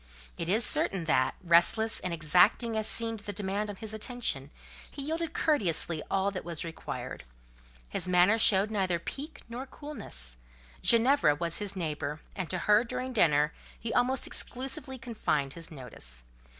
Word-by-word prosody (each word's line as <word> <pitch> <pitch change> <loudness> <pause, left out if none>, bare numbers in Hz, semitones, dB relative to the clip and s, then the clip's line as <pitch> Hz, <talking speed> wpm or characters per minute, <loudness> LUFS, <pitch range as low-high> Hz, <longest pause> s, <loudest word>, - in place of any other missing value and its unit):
It 170 - -3
is 215 +4 +3
certain 190 -3 +1
that, 130 -5 +2
restless 180 +6 +4
and 180 - -3
exacting 180 - +3
as 220 0 0
seemed 225 -1 +1
the 205 0 -5
demand 205 +1 -2
on 205 - -5
his 220 +2 -7
attention, 220 - -2 0.4
he 280 - -6
yielded 325 +2 -3
courteously 175 - +2
all 195 +1 +1
that 185 - -5
was 170 -3 -2
required: 165 -1 -6 0.6
his - - -2
manner 180 +5 +5
showed 205 0 +5
neither 190 -4 +1
pique 280 - -7
nor 245 +3 -6
coolness: 65 - -7 0.4
Ginevra 235 - +4
was 170 +2 -2
his 205 -2 -4
neighbour, 155 -3 -3 0.2
and 185 -4 -3
to 185 - 0
her, 210 +5 +4
during 255 +1 -4
dinner, 150 -7 +3 0.3
he 230 0 -4
almost 255 +1 +2
exclusively 265 +1 -3
confined 155 - -1
his 165 -1 -9
notice. 110 - -7
200 Hz, 155 wpm, -30 LUFS, 165-235 Hz, 0.6 s, manner